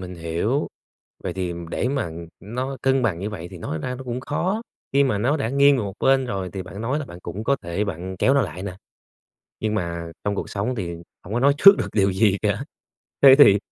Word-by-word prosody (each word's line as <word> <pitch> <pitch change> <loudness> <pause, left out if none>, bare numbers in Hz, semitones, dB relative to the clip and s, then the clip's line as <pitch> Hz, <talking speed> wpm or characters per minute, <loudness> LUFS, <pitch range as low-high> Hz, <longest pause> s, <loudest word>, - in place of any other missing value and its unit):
mình 90 -1 -7
hiểu. 85 - -1 0.6
Vậy - - -3
thì, 90 -2 -2
ừm, 85 -1 -7
để 125 - -1
mà, 140 0 -1
ừm, 85 0 -8
nó 130 +6 -4
cân 135 0 +2
bằng 95 -8 0
như 100 - -3
vậy 90 -5 -7
thì 90 - -8
nói 80 -1 -4
ra 125 +8 -3
nó 130 - -8
cũng 125 0 -4
khó, 185 +10 -1 0.3
khi 140 +1 +5
mà 130 -7 +1
nó 130 +9 +1
đã 120 -5 -1
nghiêng 140 +1 +5
về 115 - -1
một 100 - -5
bên 135 -1 +3
rồi 95 -6 -3
thì 95 -1 -4
bạn 100 - -8
nói 130 +7 -1
là 150 - -5
bạn 85 -7 -11
cũng 105 +3 -6
có 140 +4 +2
thể 85 +5 -2
bạn 95 -1 -5
kéo 135 - +3
nó 140 - +4
lại 95 -4 -5
nè, 95 -3 -5 0.9
nhưng 110 -1 -1
mà 85 -3 -3
trong 100 0 0
cuộc - - -4
sống 105 +5 -2
thì 85 -6 -4 0.3
hổng 100 +5 -6
có 120 - +1
nói 140 +2 +4
trước 200 +3 +9
được - - -2
điều 100 -2 +2
gì 100 0 +3
cả. - - 0 0.6
Thế 135 -1 +10
thì, 100 -8 +8
105 Hz, 250 wpm, -23 LUFS, 90-135 Hz, 0.9 s, Thế